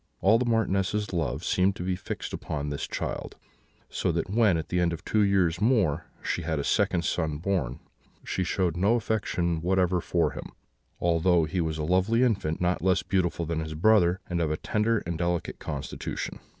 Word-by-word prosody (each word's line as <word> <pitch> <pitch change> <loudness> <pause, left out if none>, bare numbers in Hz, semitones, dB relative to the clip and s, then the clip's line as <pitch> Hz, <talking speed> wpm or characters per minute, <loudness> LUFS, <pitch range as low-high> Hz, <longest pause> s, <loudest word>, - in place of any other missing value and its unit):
All 110 +4 +4
the 125 - 0
Marchioness's 105 -2 0
love 85 -4 -1
seemed 95 +1 +2
to - - -5
be 90 0 0
fixed - - -6
upon 75 -1 -4
this 70 - -3
child, - - -4 0.5
so - - -1
that 95 - -2
when, 105 -5 +4
at 80 - -5
the 90 - 0
end 85 -1 +2
of 80 - -7
two 110 - +2
years 95 -3 +2
more, 95 - +2 0.2
she - - -1
had 80 -1 -2
a 70 - -1
second 95 -3 +1
son 80 -3 -1
born, 80 -8 -1 0.4
she 95 - -2
showed 90 -1 0
no 100 +6 +3
affection 90 -8 -1
whatever 90 0 +2
for - - +1
him, - - -8 0.5
although 85 0 +3
he 85 +3 -1
was 80 -1 -2
a 75 - -2
lovely 95 +9 +2
infant, 100 -10 0
not 90 0 0
less 95 -1 +2
beautiful 85 -3 0
than 80 0 -2
his 80 -1 -4
brother, 90 0 +4
and 85 -1 -1
of 80 - +1
a 75 - -1
tender 110 +1 0
and 85 -1 -3
delicate 85 -1 -1
constitution. 70 -2 -5
90 Hz, 190 wpm, -27 LUFS, 80-100 Hz, 0.5 s, All